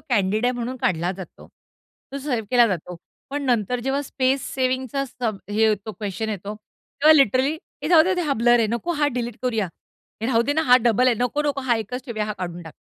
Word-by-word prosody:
Candid 210 0 +1
आहे 250 - +2
म्हणून 245 +1 -4
काढला 175 -6 0
जातो. 190 -2 -11 0.6
तो 275 - -3
सेव्ह 255 -6 -2
केला 245 -2 +6
जातो. 180 -3 -4 0.3
पण 290 +1 -3
नंतर 245 0 +1
जेव्हा 270 +2 0
स्पेस 265 -1 0
सेव्हिंगचा 260 +1 -1
सब 235 -5 -4
हे 210 +1 -1
ये 220 -1 +5
तो 220 - -4
क्वेशन 205 +2 -4
येतो, 205 0 -5
तेव्हा 280 +7 +1
लिटरली 270 0 +3 0.3
हे - - -2
राहूदे 355 +2 +5
हा 300 -4 0
ब्लर 240 0 +5
आहे 225 - +3
नको 290 +9 -1
हा 295 - +4
डिलीट 240 -2 -3
करूया. 225 -5 0 0.6
हे - - 0
राहू 235 -2 +3
देना, 290 +5 +1
हा 250 -5 +6
डबल 240 +2 +3
आहे 250 - +4
नको-नको. 285 +2 0
हा 250 -3 +1
एकच 245 +4 -5
ठेवूया 215 -4 -2
हा 215 - -2
काढून 175 -1 -5
टाक. 160 -2 -11
245 Hz, 205 wpm, -23 LUFS, 215-270 Hz, 0.6 s, केला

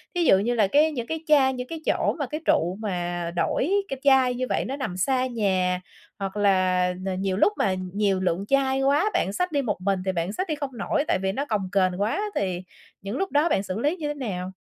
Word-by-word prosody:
thí 350 - +2
dụ 190 - +6
như 235 +5 0
là 215 -4 +3
cái 300 +8 +4
những 240 -5 -4
cái 320 0 -4
chai, 275 -3 +5
những 250 0 -5
cái 325 +2 -7
chỗ - - +1
mà 285 - 0
cái 305 +5 -5
trụ 175 +3 +2
mà 175 -4 -3
đổi 265 - 0 0.2
cái 270 - -4
chai 265 -3 +5
như 255 +1 -1
vậy - - 0
nó 265 - -3
nằm 260 -11 -4
xa 255 +7 +1
nhà, 190 -6 0 0.4
hoặc 195 +1 -4
là 185 -3 +2
là 190 -1 -1
nhiều 190 0 -1
lúc 410 - +4
mà 190 - +1 0.2
nhiều 200 -2 +1
lượng 185 +1 -1
chai 270 0 +2
quá 285 +9 +3
bạn 195 - 0
xách 360 - -1
đi 285 -2 +1
một 215 -7 -2
mình 195 0 0
thì 190 - +1
bạn 175 +2 -2
xách 370 - -2
đi 310 - -1
không 280 -4 -6
nổi 290 +8 0
tại - - +1
vì 190 - +1
nó 275 +8 -2
cồng 205 -7 -2
kềnh 185 -1 +1
quá, 220 - 0
thì 185 -2 -1 0.4
những 200 +6 -4
lúc 385 +4 -2
đó 295 +4 +3
bạn 195 - +1
xử 195 +1 -4
lý 295 +8 +1
như 310 -4 -3
thế 295 - -2
nào? 190 -10 -4
215 Hz, 250 wpm, -25 LUFS, 190-280 Hz, 0.4 s, dụ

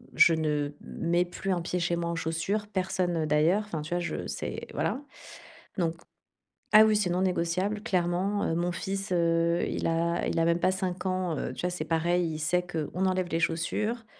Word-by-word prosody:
je 165 - +7
ne 150 -2 0
mets 175 +1 0
plus 190 +2 -4
un 180 -2 0
pied 180 +1 -2
chez 170 0 +1
moi 170 0 -2
en 170 - -2
chaussures, 165 +6 -1
personne, 185 -3 -1
heu, 160 - 0
d'ailleurs. 155 +7 +3
Enfin, 165 -7 -4
tu 155 - -8
vois, 175 - +1
je 175 - -3
c'est - - -5
voilà. 270 - -1 0.8
Donc 165 -1 0 0.8
ah 215 - +10
oui, 215 - +3
c'est 205 -4 +1
non 180 +1 0
négociable, 185 +3 0
clairement. 185 +3 0
Heu, 165 - 0
mon 175 +1 0
fils, 195 +3 -4
heu, 170 0 +2
il - - -2
a 170 +1 0
il - - 0
a 165 - +3
même 170 0 +2
pas 185 - +3
5 185 -1 -3
ans, 185 -4 -1
heu. - - -3
Tu - - -6
vois, 180 - 0
c'est 165 -3 -4
pareil. 170 +2 +1
Il - - -5
sait 180 +3 +1
qu'on 175 +2 -2
enlève 185 -1 +1
les 165 - 0
chaussures. 210 +8 -1
175 Hz, 205 wpm, -28 LUFS, 165-185 Hz, 0.8 s, ah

